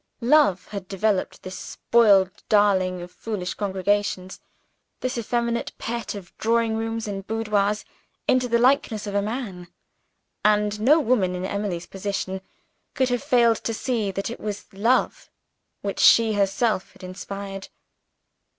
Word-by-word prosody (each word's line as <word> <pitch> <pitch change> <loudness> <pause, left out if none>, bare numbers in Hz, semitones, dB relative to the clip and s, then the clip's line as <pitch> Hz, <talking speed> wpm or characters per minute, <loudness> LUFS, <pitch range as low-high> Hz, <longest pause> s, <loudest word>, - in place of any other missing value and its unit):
Love 265 -7 +4
had 200 -3 -6
developed 195 0 -1
this 185 0 -7
spoiled 200 -5 +3 0.2
darling 190 -4 +3
of 175 - -10
foolish 195 -5 -4
congregations, 195 -1 -1 0.6
this 255 +1 -2
effeminate 235 0 -1
pet 235 -2 -4
of 190 -4 -10
drawing 230 0 +2
rooms 225 0 -3
and 195 -1 -5
boudoirs, 210 -2 0 0.4
into 255 -1 +3
the 235 -1 +2
likeness 235 -4 +2
of 205 - -5
a 200 - +2
Man 205 -5 -5 0.8
and 210 0 +2
no 290 +8 +5
woman, 220 - +1
in 180 +1 -3
Emily's 195 -3 -3
position, 190 0 -4 0.5
could 260 -2 +2
have 245 -1 0
failed 235 -2 +4
to 230 - -3
see 225 -3 -1
that 195 +3 -3
it - - -7
was 210 0 -6
love 230 +6 +1 0.5
which - - -4
she 225 -1 +6
herself 200 0 0
had - - -17
inspired. 195 +1 -7
210 Hz, 140 wpm, -24 LUFS, 195-230 Hz, 0.8 s, she